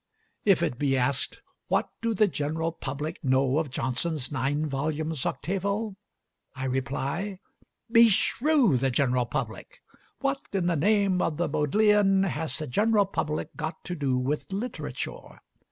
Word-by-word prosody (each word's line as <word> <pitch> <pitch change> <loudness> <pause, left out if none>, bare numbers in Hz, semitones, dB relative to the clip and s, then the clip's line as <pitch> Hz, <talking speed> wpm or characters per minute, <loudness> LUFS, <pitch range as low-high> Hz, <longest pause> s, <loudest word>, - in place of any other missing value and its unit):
If 195 -5 +4
it 125 -7 -1
be 135 -2 +2
asked, 130 +2 -1 0.2
What - - +1
do 230 -1 0
the 215 +1 +4
general 160 0 -2
public 150 +1 -5
know 130 +1 +3
of 160 -3 -2
Johnson's 130 +3 -1
nine 145 +2 0
volumes 155 +1 -2
octavo? 200 +3 -2 0.6
I 130 0 -4
reply, 140 +9 -2 0.5
Beshrew 230 - +4
the 135 +2 +1
general 125 -1 +1
public! - - -5 0.4
What 275 0 0
in 190 -3 0
the 175 -1 +2
name 195 +2 +2
of 150 - 0
the 175 - +1
Bodleian 195 +4 +3
has 160 -4 -2
the 155 - -3
general 210 - +3
public 155 -5 -3
got 160 +1 -5
to 180 - -4
do 135 -5 0
with 140 +8 -2
literature? 215 +6 -5
160 Hz, 140 wpm, -27 LUFS, 135-200 Hz, 0.6 s, If